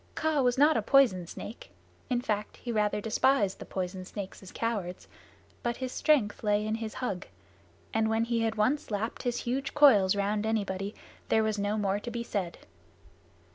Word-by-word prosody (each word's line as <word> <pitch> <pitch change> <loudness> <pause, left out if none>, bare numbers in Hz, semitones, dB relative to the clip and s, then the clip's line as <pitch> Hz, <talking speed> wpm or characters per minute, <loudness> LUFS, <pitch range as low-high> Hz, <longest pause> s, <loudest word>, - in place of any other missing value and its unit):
Kaa 315 -2 +1
was 250 0 +2
not 300 +3 +5
a - - +2
poison 230 -11 +4
snake 215 +6 -9 0.4
in 245 -1 +1
fact 210 -3 -2
he 240 - -5
rather 210 -2 +1
despised 220 -1 +2
the - - -7
poison 185 0 -4
snakes 195 +1 -7
as 190 - -11
cowards 205 -6 -3 0.5
but 240 0 -2
his 260 -1 -4
strength 255 -11 +2
lay 210 0 +2
in 215 - -1
his 225 -1 -4
hug, 200 -7 -3 0.7
and 220 0 +2
when 225 +1 +2
he 230 0 0
had 225 0 0
once 240 +8 +1
lapped 215 +2 -2
his 245 -2 -1
huge 270 +3 -2
coils 210 -11 +6
round 205 +1 0
anybody 200 -2 -2 0.3
there 220 - +4
was 215 -1 0
no 205 +1 0
more 200 -1 0
to 240 - -6
be 235 0 -3
said. 190 -7 -3
220 Hz, 180 wpm, -29 LUFS, 205-240 Hz, 0.7 s, coils